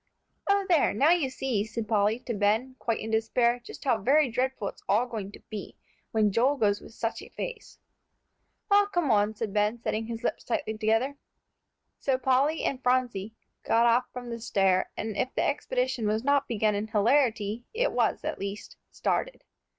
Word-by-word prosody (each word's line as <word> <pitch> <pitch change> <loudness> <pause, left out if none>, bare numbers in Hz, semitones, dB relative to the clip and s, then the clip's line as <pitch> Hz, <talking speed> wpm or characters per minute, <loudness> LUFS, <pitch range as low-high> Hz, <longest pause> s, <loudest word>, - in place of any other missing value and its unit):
"O 400 0 +3
there! 335 - +3
now 285 +9 +4
you 335 -7 +2
see," 260 -5 -1
said 220 0 -5
Polly 215 0 +2
to 240 - -4
Ben, 220 +5 +1
quite 230 -2 -1
in 220 - -5
despair, 235 +2 +2
"just - - -10
how 255 -6 +2
very 275 +4 +3
dreadful 250 -3 -1
it's - - -14
all 220 +5 +3
going 215 -5 -6
to - - -11
be, 210 -3 -8 0.3
when 215 -2 +2
Joel 255 +8 +3
goes 205 -4 +1
with 230 - -13
such 225 - -3
a - - -11
face." 480 -3 -7 0.9
"Well, 405 0 +6
come 350 -9 0
on," 210 0 +2
said 215 -2 -4
Ben, 210 +2 +1
setting 225 -1 -2
his 230 0 -6
lips - - -2
tightly 290 -9 -2
together. 225 +6 +1 0.8
So 265 -2 +1
Polly 265 +5 +2
and 265 -1 -1
Phronsie 245 -5 0 0.3
got 230 +1 +3
off 235 +1 +4
from 245 -1 -7
the 235 - -4
stair, 195 -4 +2
and 220 -1 -3
if 255 - -2
the - - +1
expedition - - -1
was 215 +2 0
not 280 0 +2
begun 215 -2 +1
in 205 +1 -2
hilarity, 225 -1 +1
it - - 0
was - - 0
at - - -3
least 200 +1 -6
started. - - -2
235 Hz, 185 wpm, -28 LUFS, 215-265 Hz, 0.9 s, Well